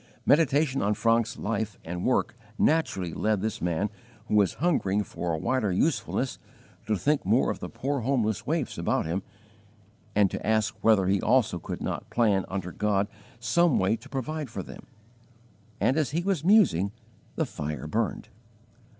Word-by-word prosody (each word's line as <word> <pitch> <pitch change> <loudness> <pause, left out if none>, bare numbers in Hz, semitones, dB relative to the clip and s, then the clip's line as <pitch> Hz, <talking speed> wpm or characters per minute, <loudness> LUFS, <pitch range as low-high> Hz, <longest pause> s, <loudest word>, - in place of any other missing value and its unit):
Meditation 145 -2 +3
on 105 +1 +1
Franeke's 115 +1 +1
life 110 -1 -2
and 90 +2 -4
work - - +1 0.2
naturally 95 - +1
led 110 -2 +1
this 110 +1 -3
man 90 +4 0 0.4
who - - -3
was 100 -3 +3
hungering 105 - +1
for 85 -2 -4
a 80 - 0
wider 110 +3 0
usefulness 135 - 0 0.5
to 110 - +2
think 145 +8 +1
more 110 +7 +3
of - - -6
the - - -6
poor 140 +1 -2
homeless 115 -5 0
waifs - - -1
about - - 0
him, 85 +5 -1 0.9
and 100 -2 +4
to - - -5
ask 110 -1 +1
whether 110 -4 +4
he 95 +1 +2
also 120 -8 +2
could - - -6
not - - -4
plan 105 -5 +2
under 95 -2 -4
God 100 +1 0 0.3
some 170 +6 +3
way 95 +4 +2
to 115 - -13
provide 145 +2 -3
for 115 - -5
them; - - -12 0.9
and 130 - +2
as 155 -3 +1
he 165 +4 -1
was 190 -6 0
musing 170 - +4 0.4
the - - 0
fire 75 -2 -5
burned. 110 +8 -2
110 Hz, 165 wpm, -27 LUFS, 95-135 Hz, 0.9 s, and